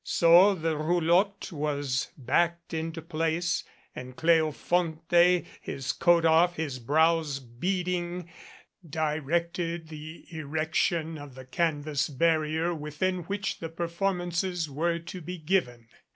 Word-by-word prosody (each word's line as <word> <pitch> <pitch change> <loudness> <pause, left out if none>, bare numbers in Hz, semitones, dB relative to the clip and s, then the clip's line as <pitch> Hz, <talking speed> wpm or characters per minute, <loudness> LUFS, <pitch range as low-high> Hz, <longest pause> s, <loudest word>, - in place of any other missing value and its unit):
So 175 +4 +6
the 160 -2 -1
roulotte 175 +6 +1
was 145 -4 -1
backed 170 +6 0
into 165 0 -4
place 165 +1 -1 0.3
and 125 0 -8
Cleofonte, 165 +2 +2 0.2
his 130 -1 -3
coat 170 +5 +3
off, 165 +2 +4
his 145 -5 -3
brows 155 +2 +2
beading, 175 +7 -3 0.6
directed 165 +2 -2
the 155 +1 -9
erection 160 +1 -1
of 145 -3 -10
the 130 -1 -10
canvas 150 0 -1
barrier 160 +3 +1
within 165 +4 -2
which 200 +1 -3
the 165 - -5
performances 175 0 -1
were 165 +4 -1
to 170 +2 -8
be 180 +3 -6
given. 150 -9 -1
165 Hz, 110 wpm, -28 LUFS, 150-175 Hz, 0.6 s, So